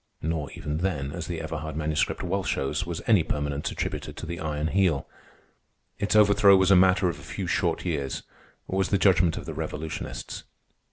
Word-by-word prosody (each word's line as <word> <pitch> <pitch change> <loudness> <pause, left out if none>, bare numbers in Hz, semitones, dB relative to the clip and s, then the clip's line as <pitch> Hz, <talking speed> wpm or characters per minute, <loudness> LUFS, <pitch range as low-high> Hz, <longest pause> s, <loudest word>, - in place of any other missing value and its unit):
Nor 80 -2 -2
even 75 +1 -4
then, 75 -7 -1
as - - -5
the - - -3
Everhard 80 -1 -5
Manuscript 75 0 0
well 95 +2 -1
shows, 75 +2 -1
was 85 -2 -4
any 105 -6 +5
permanence 75 -2 -2
attributed - - -4
to - - -6
the 85 +1 -5
Iron 75 -1 -2
Heel. 90 -7 +1 0.9
Its 100 +1 0
overthrow 100 -2 +6
was 95 0 +3
a - - +8
matter 90 0 +5
of 85 -5 -3
a - - -12
few 95 - -5
short 85 -1 0
years, 70 -6 -2 0.4
was 95 0 0
the 100 - +3
judgment 90 -4 +3
of - - -6
the - - -5
revolutionists. 75 +1 -5
85 Hz, 180 wpm, -26 LUFS, 75-95 Hz, 0.9 s, a